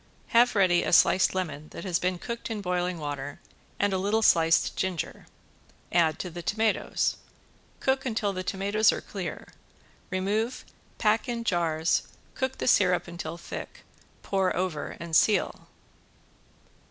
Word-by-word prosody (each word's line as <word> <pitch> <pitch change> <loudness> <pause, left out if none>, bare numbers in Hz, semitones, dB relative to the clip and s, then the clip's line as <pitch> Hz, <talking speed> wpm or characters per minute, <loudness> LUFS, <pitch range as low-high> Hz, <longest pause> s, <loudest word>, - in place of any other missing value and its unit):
Have 240 +1 +4
ready 185 -3 +4
a - - -2
sliced 185 +2 +5
lemon 155 -5 -3
that - - -8
has 180 -3 0
been 180 0 0
cooked 235 +6 -6
in 220 -2 -3
boiling 180 -2 -1
water 145 -2 -5 0.4
and 200 -1 +2
a 190 - +1
little 210 +4 +1
sliced 165 -4 +4
ginger. 185 -5 -3 0.6
Add 165 -2 +3
to 180 - -5
the 175 +1 -6
tomatoes. 220 +5 0 0.6
Cook 265 0 +1
until 220 -6 -1
the 185 - -3
tomatoes 200 +3 +2
are - - -4
clear, - - -6 0.6
remove, 205 +6 -1 0.3
pack 220 +3 +1
in 235 -1 -2
jars, 165 -5 +1 0.3
cook 260 +1 -2
the - - -3
syrup 180 -6 +3
until 170 -1 -6
thick, 170 - -8 0.4
pour 190 -2 0
over 180 -5 -3
and 170 -2 -3
seal. 215 - +2
185 Hz, 140 wpm, -27 LUFS, 170-215 Hz, 0.6 s, sliced